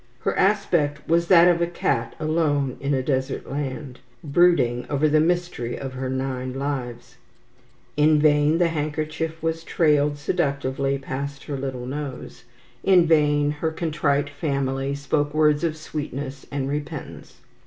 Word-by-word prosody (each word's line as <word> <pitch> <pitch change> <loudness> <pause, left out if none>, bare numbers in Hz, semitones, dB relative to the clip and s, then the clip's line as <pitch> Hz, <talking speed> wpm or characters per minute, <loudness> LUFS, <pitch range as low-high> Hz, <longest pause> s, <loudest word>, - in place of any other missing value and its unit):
Her - - -1
aspect 175 -7 +1
was 170 +1 +2
that 175 -1 +7
of 175 -1 +3
a 170 - +2
cat 140 -8 -1
alone 155 -4 0
in 140 0 0
a 130 - -1
desert 130 -1 -2
land, 135 -2 -5 0.2
brooding 140 -6 +3
over 145 +1 +2
the 155 +1 +3
mystery 170 -7 -1
of 135 -1 -6
her 130 0 -4
nine 130 -1 -3
lives. 130 -4 -4 0.8
In 150 +1 +4
vain 150 +1 +4
the 175 -1 +3
handkerchief 155 +1 -3
was 165 0 -1
trailed 150 -3 +2
seductively 140 -3 -1
past 140 +1 -5
her 145 - -5
little 130 -2 -4
nose, 140 -2 -6 0.4
in 185 -3 +5
vain 150 -2 +3
her 150 +2 -2
contrite 150 -3 -1
family 140 -2 -2
spoke 145 +1 -1
words 150 0 +3
of 160 -2 -1
sweetness 145 -3 -6
and 140 -1 -2
repentance. 145 0 -6
145 Hz, 145 wpm, -23 LUFS, 135-155 Hz, 0.8 s, that